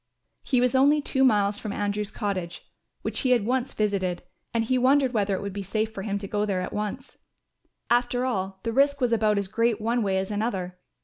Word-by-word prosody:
He 255 -3 +1
was 250 -1 +2
only 280 +3 +5
two 265 -2 +1
miles 205 -4 +3
from 215 - -5
Andrew's 205 0 -2
cottage, 185 -5 -4 0.4
which - - -2
he 260 - 0
had 240 -5 +3
once 255 +2 0
visited, 195 -4 -1 0.3
and 230 -1 +1
he 255 +3 +1
wondered 265 0 +3
whether 200 -3 +1
it 190 - -5
would 200 -1 -4
be 200 - -4
safe 215 +3 -2
for 195 - -5
him 200 0 -2
to 200 0 -6
go 205 +1 -1
there 195 -3 -1
at 180 - -5
once. 210 +6 -5 0.7
After 245 +1 +1
all, 190 -6 -2
the 230 - -2
risk 280 +2 +3
was 245 -3 +1
about 215 -2 +2
as 200 -1 -1
great 230 +2 +1
one 230 +2 0
way 195 -3 +1
as 190 +2 -2
another. 190 -4 -3
215 Hz, 220 wpm, -26 LUFS, 200-245 Hz, 0.7 s, only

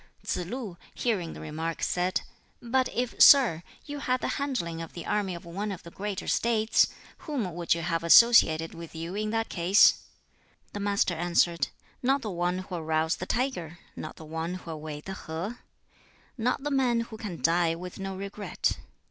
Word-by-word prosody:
Tsz 180 -1 -2
lu, 220 -5 -5 0.2
hearing 195 -9 -1
the - - -9
remark 160 +2 -4
said, 180 +1 0 0.4
"But 255 +1 +1
if, 245 -1 -2
sir, 250 - +8 0.2
you 290 -1 -6
had 255 -2 0
the - - -1
handling 170 -13 -2
of 165 - -8
the 170 - -7
army 195 -4 -1
of 170 - -10
one 200 +5 -4
of 185 - -7
the 170 - -11
greater 200 0 -4
States, 225 -1 +3 0.3
whom 245 - -3
would 170 0 +1
you 170 - -4
have 165 0 -1
associated 165 -4 +6
with 165 -1 -10
you 165 +2 -5
in 215 +1 -2
that 225 0 -1
case?" 185 +3 +5 0.7
The 205 - -4
Master 200 -3 +1
answered: 170 0 +2 0.3
"Not 270 +2 +2
the 215 - -3
one 175 0 0
'who'll 185 -2 -5
rouse 160 0 +1
the 185 - -6
tiger,' 220 - -2 0.2
Not - - -7
the 160 - -11
one 165 +3 -4
'who'll 165 -4 -7
wade 150 -1 -7
the 195 - -5
Ho;' 185 +6 -5 0.8
not 250 +3 -1
the 295 - -2
man 250 -4 +2
who 230 -1 -7
can 190 -7 -6
die 165 +4 +2
with 180 +2 -8
no 195 0 -4
regret. 200 +1 -2
185 Hz, 180 wpm, -28 LUFS, 165-225 Hz, 0.8 s, sir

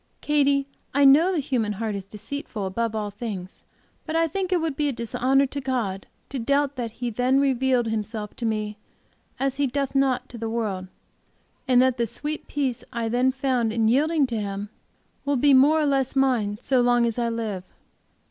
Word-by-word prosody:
Katy, 280 -2 +2 0.3
I 285 0 +5
know 305 +7 +6
the 365 - 0
human 245 -7 0
heart 215 +1 -3
is 195 -2 -5
deceitful 215 +1 -6
above 225 +4 -2
all 210 -1 -2
things, 200 -4 -6 0.5
but 315 - -3
I 330 0 +3
think 375 +3 -3
it 360 - +3
would 320 -3 -2
be 295 +1 0
a - - 0
dishonor 255 +3 +1
to 280 +1 -5
God 230 -8 -2 0.2
to 270 - -4
doubt 280 +3 +1
that 235 -3 -4
He 245 0 -4
then 250 +4 +2
revealed 265 -2 +2
Himself 215 -1 -4
to 235 - -3
me 215 -1 -2 0.6
as 270 0 0
He 285 -1 +2
doth 275 +1 -2
not 270 -2 +1
to 235 - -9
the 225 0 -3
world, 210 -5 -2 0.8
and 250 -1 +5
that 260 -1 +2
the 235 -1 0
sweet 295 +7 -5
peace 265 -4 -2
I 235 -2 -2
then 250 +3 +2
found 255 -4 0
in 225 0 +1
yielding 295 +5 +3
to 235 -4 -3
Him 200 0 -4 0.5
will 285 0 +1
be 285 +3 +4
more 285 +4 +6
or 305 - +2
less 270 -2 +1
mine 245 -7 +2
so 260 -2 +2
long 245 -1 +3
as 230 0 -1
I 235 -1 +1
live. 220 -5 -3
250 Hz, 195 wpm, -24 LUFS, 225-275 Hz, 0.8 s, know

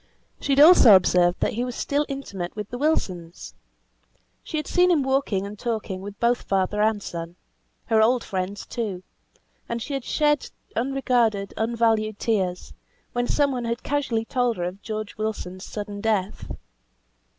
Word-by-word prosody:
She 280 - 0
had 275 - +3
also 295 - +9
observed 180 -1 +3
that - - +1
he 235 +3 -1
was 250 -1 -4
still 290 +1 0
intimate 200 -11 -5
with 210 -1 -5
the 245 - -5
Wilsons. 185 - -2 0.9
She 315 - -4
had 305 - -2
seen 360 +4 +3
him 320 -6 +3
walking 265 -8 0
and 205 0 -8
talking 215 -5 -3
with 200 +1 -9
both 235 +1 +2
father 195 +2 0
and 215 -1 +1
son; 170 0 -6 0.5
her 220 -1 +3
old 240 +2 +3
friends 190 +1 -4
too; 200 -6 -4 0.7
and 235 - -2
she 280 +5 -5
had 270 -2 -2
shed 295 0 +1 0.3
unregarded, 240 -5 +1
unvalued 220 -2 +1
tears, 190 -6 -1 0.4
when 245 0 0
some 285 -1 +2
one 245 -2 -3
had 235 +1 -3
casually 270 -6 -1
told 245 -2 0
her 175 - -2
of 180 +3 -5
George 215 -1 -5
Wilson's 200 -4 -4
sudden 205 -1 -6
death. 210 -3 -1
220 Hz, 160 wpm, -24 LUFS, 195-250 Hz, 0.9 s, also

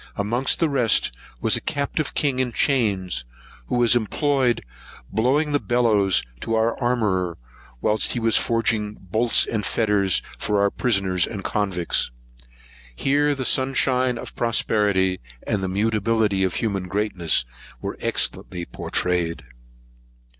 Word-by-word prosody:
Amongst 120 +6 0
the 165 - +3
rest 125 -7 +2 0.3
was - - +3
a - - -2
captive 140 +1 -2
king 140 -3 +1
in 125 -2 0
chains, 100 - +1 0.4
who - - -1
was 120 -1 +4
employed 125 +2 +1 0.5
blowing 140 +7 +1
the 145 - +2
bellows 110 -7 +2 0.2
to 115 - -2
our 110 +1 +1
armourer, 105 -8 0 0.4
whilst 110 0 +1
he 120 - -1
was 115 -1 +2
forging 110 -2 +1
bolts 110 +6 +2
and 110 -2 -2
fetters 105 -4 +1 0.2
for 105 -1 0
our 100 0 +3
prisoners 95 -7 +1
and 100 -4 -6
convicts. 95 -5 -1 0.9
Here 145 - +2
the 130 -2 -4
sunshine 130 -1 +1
of - - -8
prosperity, 105 -5 +1 0.3
and 100 - -1
the 95 - -2
mutability 105 0 +1
of 95 - 0
human 100 -5 -2
greatness, 95 - 0 0.3
were - - -5
excellently 90 -2 -2
pourtrayed. 85 -2 -2
110 Hz, 130 wpm, -23 LUFS, 95-125 Hz, 0.9 s, was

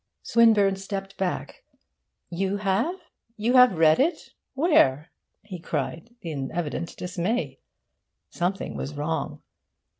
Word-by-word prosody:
Swinburne 215 -4 +4
stepped 195 0 -6
back. 195 - -3 0.7
'You 190 +3 -1
have? 210 - 0 0.4
You 225 +4 0
have 250 -7 +6
read 160 -1 +5
it? 290 -2 0 0.2
Where?' 165 - +3 0.3
he 190 -4 -8
cried, 160 - -4
in 145 -6 -4
evident 170 0 -4
dismay. 180 +7 -2 0.7
Something 185 +3 -2
was 145 +2 -5
wrong. 150 +3 -3
195 Hz, 110 wpm, -25 LUFS, 165-230 Hz, 0.7 s, have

